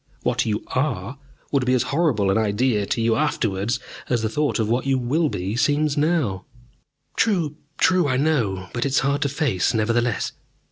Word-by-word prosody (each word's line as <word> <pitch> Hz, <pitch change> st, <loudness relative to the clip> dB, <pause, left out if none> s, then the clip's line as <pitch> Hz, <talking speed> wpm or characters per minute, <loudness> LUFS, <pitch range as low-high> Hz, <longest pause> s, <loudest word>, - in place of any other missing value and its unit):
What -, -, 0 dB
you 105 Hz, -1 st, -1 dB
are 130 Hz, -2 st, -2 dB, 0.3 s
would 140 Hz, -3 st, +2 dB
be 125 Hz, +1 st, +2 dB
as 125 Hz, -, +2 dB
horrible 135 Hz, -, +2 dB
an 95 Hz, -, +2 dB
idea 105 Hz, 0 st, +1 dB
to 125 Hz, -, -1 dB
you 115 Hz, 0 st, +2 dB
afterwards 115 Hz, -6 st, 0 dB, 0.3 s
as 120 Hz, -3 st, +1 dB
the 110 Hz, -, 0 dB
thought 150 Hz, +5 st, 0 dB
of 110 Hz, -3 st, 0 dB
what 120 Hz, +4 st, 0 dB
you 135 Hz, -1 st, +2 dB
will 145 Hz, +6 st, +1 dB
be 95 Hz, +1 st, -3 dB
seems 145 Hz, +3 st, +1 dB
now." 145 Hz, -, 0 dB, 0.7 s
"True, 170 Hz, -9 st, +1 dB, 0.2 s
true. 180 Hz, -4 st, +3 dB
I 130 Hz, -2 st, +1 dB
know 125 Hz, -11 st, +1 dB
it. 90 Hz, -, -15 dB
But 120 Hz, -, -1 dB
it 135 Hz, -, -3 dB
is -, -, +4 dB
hard 140 Hz, +2 st, 0 dB
to 145 Hz, -, +1 dB
face, 130 Hz, -, 0 dB
nevertheless." 115 Hz, +1 st, 0 dB
125 Hz, 190 wpm, -23 LUFS, 110-145 Hz, 0.7 s, is